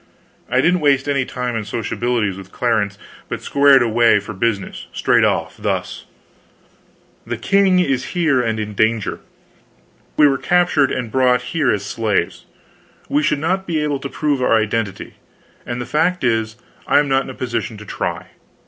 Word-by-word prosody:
I 125 +2 +2
didn't 180 +4 +2
waste 140 -3 +2
any 140 -2 +1
time 125 -2 -4
in 115 - -1
sociabilities 115 -1 -2
with 95 0 -11
Clarence, 110 -4 0 0.3
but - - -5
squared 140 -2 +5
away 115 -1 +3
for 105 +2 -8
business, 100 0 -2
straight - - +2
off - - 0
thus: - - -3 1.2
"The - - -4
king 195 -2 +3
is 135 -8 +1
here 155 -7 +3
and 115 -2 -1
in 105 -1 -4
danger. 110 +1 0 1.0
We 150 - +7
were 135 -2 +1
captured 175 -6 +2
and 120 -3 -3
brought 125 -1 +2
here 155 -5 +2
as 100 -1 -2
slaves. 105 -5 -2 0.6
We 145 - +2
should 150 0 +1
not 185 +6 -1
be 165 -2 -1
able 150 -2 -1
to 140 - -6
prove 145 -3 -1
our 120 -2 +3
identity 110 -2 -3 0.5
and 120 0 -3
the 120 - -4
fact 160 +7 0
is, 110 -2 0 0.3
I - - +4
am 145 - +3
not 135 0 +2
in - - -9
a 130 - -8
position 115 -3 -3
to 105 - -11
try. - - -4
125 Hz, 170 wpm, -19 LUFS, 110-145 Hz, 1.2 s, We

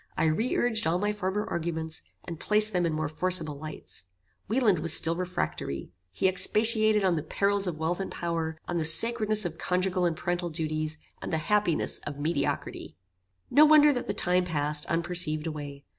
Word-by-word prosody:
I - - +1
re 185 +11 0
urged 225 -2 +2
all 165 +2 +1
my 205 +2 -1
former 205 +1 -3
arguments, 160 -1 -4 0.2
and 165 -3 -7
placed 215 0 +2
them 175 -2 +1
in 160 - -2
more 155 0 -2
forcible 160 -2 -1
lights. 150 - -7 0.4
Wieland 220 -5 +2
was 160 0 +4
still 165 0 +5
refractory. 75 - -4 0.2
He 95 - 0
expatiated 215 +3 +2
on 180 -3 +2
the - - -2
perils 200 +5 0
of 170 -3 -3
wealth 160 +3 -2
and 195 - -4
power, 165 -2 -4
on 175 - -2
the 165 - 0
sacredness 215 +5 +4
of 165 -1 -5
conjugal 180 0 0
and 165 -2 -1
parental 175 0 -2
duties, 155 0 -3 0.2
and - - -6
the 160 - 0
happiness 190 0 0
of 145 -1 -8
mediocrity. 145 - -3 0.6
"No 295 - +6
wonder 300 -1 +6
that 245 - -4
the - - -3
time 180 0 +1
passed, 150 -3 +1
unperceived, 170 -2 -2
away. 145 -3 -7
175 Hz, 180 wpm, -27 LUFS, 155-200 Hz, 0.6 s, No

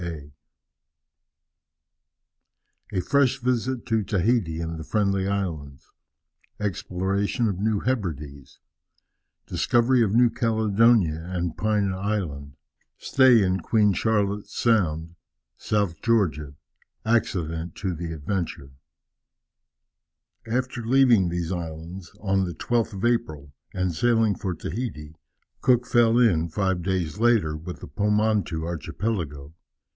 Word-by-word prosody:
A 90 - 0
fresh 135 +4 +2
visit 125 0 -1
to 110 -1 +1
Tahiti 95 -3 0
and 80 -1 -4
the - - -6
Friendly 100 +1 0
Islands 80 -9 -4 0.7
Exploration 100 +3 -1
of 95 -3 -2
New 105 0 0
Hebrides 75 - -4 0.9
Discovery 120 +1 +2
of 105 -1 0
New 120 0 +5
Caledonia 110 -7 +2
and 90 -2 -2
Pine 105 -2 0
Island 90 -9 -3 0.4
Stay 130 -5 +4
in 95 0 +1
Queen 105 +2 +2
Charlotte's 105 0 -1
Sound 85 -8 +1 0.4
South 100 -5 -1
Georgia 85 - 0 0.5
Accident 85 -8 -1
to 95 -3 -3
the 85 0 -5
Adventure. 80 -3 -4 1.8
After 125 0 -2
leaving 120 -6 +4
these 85 0 -3
islands, 85 +1 -6
on 95 -2 +1
the 85 -3 -5
12th 115 +3 -1
of 100 +3 -3
April, 80 - -1 0.2
and 95 -2 -1
sailing 115 +3 +2
for 95 -2 -4
Tahiti, 80 -5 -5 0.5
Cook 125 -1 +3
fell 120 -1 +3
in, 90 -9 +3
five 95 0 -1
days 95 0 -2
later, 115 -10 +3
with 85 +3 -8
the - - -8
Pomotou 105 -5 0
archipelago. 85 -4 -4
100 Hz, 110 wpm, -25 LUFS, 85-115 Hz, 1.8 s, New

